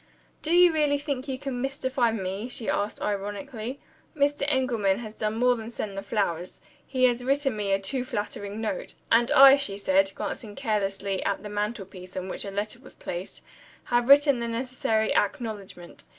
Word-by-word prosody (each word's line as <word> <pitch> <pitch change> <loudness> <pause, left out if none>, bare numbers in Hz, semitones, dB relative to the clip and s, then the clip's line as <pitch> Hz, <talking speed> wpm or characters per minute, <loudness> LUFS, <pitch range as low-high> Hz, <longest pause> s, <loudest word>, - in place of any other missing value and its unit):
"Do 315 - -2
you 355 -1 +7
really 295 -2 +2
think 280 -2 -4
you 265 -1 -3
can 265 -2 -4
mystify 260 -2 0
me?" 200 +1 -3
she 235 -2 -1
asked 205 +1 -1
ironically. 215 +5 -4 0.4
"Mr. 285 0 +2
Engelman 240 -8 +1
has 220 -3 -7
done 215 0 -2
more 250 +1 +4
than 225 -1 -7
send 210 -4 -5
the 195 - -3
flowers 195 -4 -2 0.3
he 260 -2 -1
has 245 -1 +3
written 275 -1 +1
me 205 -2 -2
a 195 - +4
too 245 +7 -2
flattering 205 -3 -4
note. 215 -4 -3 0.2
And 235 +1 +5
I," 270 +1 +9
she 205 -8 -2
said, 195 -1 +2
glancing 210 -4 -5
carelessly 200 -5 -1
at 200 0 -1
the 210 - -6
mantelpiece, 200 -3 -5
on 185 0 -4
which - - -4
a - - -4
letter 205 +4 -3
was - - -15
placed, 175 +2 -6 0.4
"have 240 +1 +1
written 280 -2 +7
the 235 - -2
necessary 230 -2 0
acknowledgment. 205 -5 -3
225 Hz, 180 wpm, -27 LUFS, 200-260 Hz, 0.4 s, I